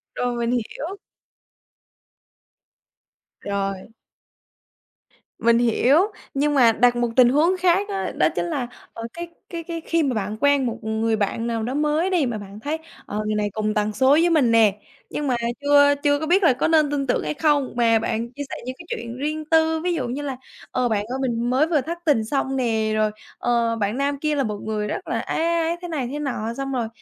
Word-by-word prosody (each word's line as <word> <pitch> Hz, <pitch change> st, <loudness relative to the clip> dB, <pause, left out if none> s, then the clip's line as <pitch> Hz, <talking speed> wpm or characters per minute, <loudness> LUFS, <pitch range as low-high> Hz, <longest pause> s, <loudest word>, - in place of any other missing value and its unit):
Rồi, 245 Hz, -1 st, -1 dB
mình 235 Hz, 0 st, -1 dB
hiểu. 285 Hz, -, -3 dB, 2.4 s
Rồi. 195 Hz, -1 st, -2 dB, 1.6 s
Mình 235 Hz, 0 st, +4 dB
hiểu, 245 Hz, +4 st, +3 dB, 0.4 s
nhưng 290 Hz, +1 st, +1 dB
mà 245 Hz, -5 st, +6 dB
đặt 245 Hz, +2 st, +3 dB
một 240 Hz, -1 st, 0 dB
tình 250 Hz, -2 st, +7 dB
huống 330 Hz, +7 st, +3 dB
khác 370 Hz, +3 st, +2 dB
á. 390 Hz, -1 st, -2 dB
Đó -, -, +4 dB
chính -, -, -1 dB
là, 285 Hz, -8 st, -2 dB, 0.3 s
ờ, 230 Hz, -, -7 dB
cái 345 Hz, +1 st, -6 dB, 0.2 s
cái 335 Hz, -1 st, -5 dB
cái 335 Hz, 0 st, -5 dB
khi 330 Hz, -1 st, +1 dB
mà 270 Hz, -, 0 dB
bạn 215 Hz, -1 st, -3 dB
quen 285 Hz, -2 st, +3 dB
một 230 Hz, -1 st, -2 dB
người 220 Hz, +1 st, 0 dB
bạn 215 Hz, +2 st, -1 dB
nào 230 Hz, -1 st, -2 dB
đó 245 Hz, +4 st, -3 dB
mới 300 Hz, +5 st, +1 dB
đi 350 Hz, -6 st, +2 dB
mà 240 Hz, -3 st, -2 dB
bạn 200 Hz, +1 st, -10 dB
thấy, 295 Hz, +6 st, -2 dB, 0.3 s
ờ, 210 Hz, +1 st, -3 dB
người 215 Hz, 0 st, -1 dB
này 210 Hz, -1 st, 0 dB
cùng 215 Hz, -1 st, -1 dB
tần 210 Hz, 0 st, 0 dB
số 260 Hz, +4 st, +3 dB
với 330 Hz, +4 st, +5 dB
mình 280 Hz, -8 st, +3 dB
nè. 220 Hz, -3 st, +5 dB, 0.3 s
Nhưng 295 Hz, -, -3 dB
mà 255 Hz, -, +2 dB, 0.3 s
chưa 285 Hz, 0 st, +5 dB
chưa 285 Hz, 0 st, +3 dB
có 315 Hz, -, -3 dB
biết 370 Hz, +4 st, +3 dB
là 300 Hz, -, +6 dB
có 250 Hz, -, 0 dB
nên 310 Hz, -3 st, +3 dB
tin 275 Hz, -2 st, -1 dB
tưởng -, -, +1 dB
hay -, -, -2 dB
không? 290 Hz, -3 st, +1 dB
Mà 230 Hz, -2 st, +3 dB
bạn 225 Hz, +2 st, -2 dB
chia 285 Hz, +2 st, -5 dB
sẻ -, -, -5 dB
những 255 Hz, -, -5 dB
cái 345 Hz, -, -10 dB
chuyện 235 Hz, +1 st, -5 dB
riêng 305 Hz, +3 st, -3 dB
tư, 320 Hz, 0 st, +3 dB
ví 355 Hz, -1 st, +1 dB
dụ 265 Hz, -7 st, -2 dB
như 260 Hz, +4 st, -4 dB
là: 275 Hz, -3 st, -4 dB, 0.3 s
"Ờ, 250 Hz, -1 st, 0 dB
bạn 205 Hz, -2 st, 0 dB
ơi 255 Hz, +4 st, -4 dB
mình 240 Hz, -2 st, -1 dB
mới 265 Hz, +5 st, +3 dB
vừa 310 Hz, -5 st, +2 dB
thất 335 Hz, +6 st, -5 dB
tình 275 Hz, -9 st, +3 dB
xong 270 Hz, +2 st, -1 dB
nè", 225 Hz, -4 st, 0 dB
rồi 215 Hz, 0 st, +2 dB, 0.3 s
"ờ, 235 Hz, -1 st, +1 dB
bạn 210 Hz, +1 st, -1 dB
nam 280 Hz, 0 st, -1 dB
kia 305 Hz, 0 st, 0 dB
là 275 Hz, -, +1 dB
một 210 Hz, -3 st, -3 dB
người 215 Hz, -1 st, -2 dB
rất -, -, -5 dB
là -, -, -1 dB
ấy, 320 Hz, -, -2 dB
ấy, 335 Hz, 0 st, +2 dB
ấy 330 Hz, +1 st, -1 dB
thế 350 Hz, -, -5 dB
này 285 Hz, -7 st, -2 dB
thế 295 Hz, -, -4 dB
nọ." 240 Hz, -6 st, -3 dB
Xong 275 Hz, 0 st, -3 dB
rồi, 240 Hz, -4 st, -1 dB
260 Hz, 220 wpm, -23 LUFS, 230-300 Hz, 2.4 s, tình